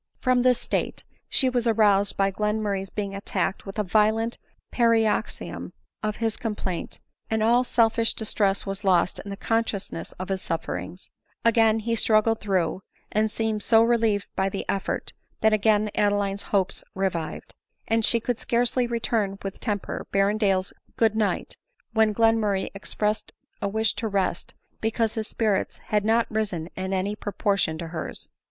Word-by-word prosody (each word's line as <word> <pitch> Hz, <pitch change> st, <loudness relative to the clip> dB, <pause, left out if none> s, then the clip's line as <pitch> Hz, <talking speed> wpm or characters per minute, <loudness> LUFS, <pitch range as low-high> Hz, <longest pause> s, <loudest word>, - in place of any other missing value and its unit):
From 255 Hz, -1 st, +2 dB
this 250 Hz, -1 st, +4 dB
state -, -, -2 dB, 0.3 s
she 265 Hz, -, +2 dB
was 245 Hz, -2 st, +1 dB
aroused 205 Hz, -3 st, +3 dB
by 195 Hz, 0 st, +2 dB
Glenmurray's 210 Hz, -1 st, -1 dB
being 200 Hz, -2 st, -4 dB
attacked 195 Hz, 0 st, -2 dB
with 195 Hz, -, -7 dB
a 210 Hz, -, +1 dB
violent 220 Hz, +4 st, +2 dB, 0.3 s
paroxysm 225 Hz, -2 st, +1 dB, 0.3 s
of 215 Hz, -1 st, -1 dB
his 225 Hz, -1 st, -1 dB
complaint, 205 Hz, -6 st, -4 dB, 0.3 s
and 220 Hz, -1 st, +1 dB
all 240 Hz, +3 st, +4 dB
selfish 230 Hz, -2 st, +2 dB
distress 200 Hz, -3 st, 0 dB
was 195 Hz, +1 st, -4 dB
lost 180 Hz, -2 st, +3 dB
in 200 Hz, -, -8 dB
the 200 Hz, -, -5 dB
consciousness 200 Hz, -, -2 dB
of 185 Hz, +1 st, -7 dB
his 190 Hz, -1 st, -1 dB
sufferings; 170 Hz, +2 st, -4 dB, 0.3 s
again 225 Hz, -1 st, +5 dB
he 225 Hz, +1 st, -2 dB
struggled 220 Hz, 0 st, +3 dB
through, 185 Hz, -3 st, 0 dB, 0.3 s
and 215 Hz, +1 st, +2 dB
seemed 220 Hz, -1 st, -1 dB
so 225 Hz, +1 st, +5 dB
relieved 225 Hz, -3 st, +2 dB
by 190 Hz, 0 st, +1 dB
the 195 Hz, -, -4 dB
effort, 195 Hz, -, -2 dB, 0.3 s
that 220 Hz, 0 st, +4 dB
again 215 Hz, 0 st, +3 dB
Adeline's 205 Hz, -1 st, +1 dB
hopes 195 Hz, -2 st, +1 dB
revived; 185 Hz, -4 st, -3 dB, 0.3 s
and 225 Hz, 0 st, +2 dB
she 235 Hz, -, +3 dB
could 240 Hz, 0 st, -2 dB
scarcely 245 Hz, 0 st, +1 dB
return, 225 Hz, -4 st, -1 dB
with 195 Hz, -1 st, -5 dB
temper, 205 Hz, -4 st, -3 dB
Berrendale's 195 Hz, -1 st, +2 dB
" -, -, -34 dB
good 220 Hz, -2 st, +3 dB
night," 215 Hz, -2 st, -1 dB, 0.4 s
when 220 Hz, -1 st, +4 dB
Glenmurray 215 Hz, -3 st, +2 dB
expressed 210 Hz, +2 st, -2 dB, 0.3 s
a 200 Hz, -, 0 dB
wish 220 Hz, +2 st, +1 dB
to 225 Hz, -, -1 dB
rest, 195 Hz, -4 st, -1 dB, 0.2 s
because 225 Hz, 0 st, 0 dB
his 220 Hz, -1 st, -3 dB
spirits 215 Hz, -4 st, 0 dB
had 210 Hz, -1 st, -1 dB
not 225 Hz, +2 st, +3 dB
risen 195 Hz, -7 st, -2 dB
in 190 Hz, 0 st, -3 dB
any 195 Hz, +2 st, 0 dB
proportion 200 Hz, -5 st, 0 dB
to 165 Hz, 0 st, -6 dB
hers. 160 Hz, -1 st, -6 dB
210 Hz, 155 wpm, -25 LUFS, 195-225 Hz, 0.4 s, again